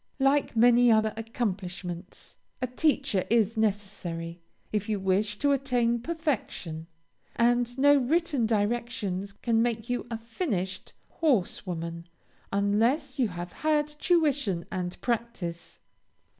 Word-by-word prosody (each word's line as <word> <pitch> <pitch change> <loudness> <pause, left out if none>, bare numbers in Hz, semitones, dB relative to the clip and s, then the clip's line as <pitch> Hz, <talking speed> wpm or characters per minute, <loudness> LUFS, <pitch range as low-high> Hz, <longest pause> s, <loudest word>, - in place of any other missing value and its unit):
Like 275 -1 +2
many 240 +1 +6
other 220 -1 +3
accomplishments, 190 -5 -5 0.2
a 255 - 0
teacher 260 - +1
is 225 -1 +3
necessary, 190 -6 -2 0.3
if 210 0 -1
you 210 -2 0
wish 200 +3 +1
to 285 +4 +2
attain 245 -4 +1
perfection, 240 - -3 0.5
and 240 +1 +2
no 285 +2 +6
written 285 -2 +1
directions 205 -3 -1
can 225 +3 +1
make 235 0 -1
you 245 0 -2
a 230 - -3
finished 225 - -3
horse 250 - 0
woman, 170 -1 -5 0.4
unless 230 +8 +1
you 250 - +4
have 175 -2 -6
had 305 -1 +1
tuition 295 - +1
and 180 -1 -3
practice. 230 -8 -3
225 Hz, 115 wpm, -28 LUFS, 190-255 Hz, 0.5 s, many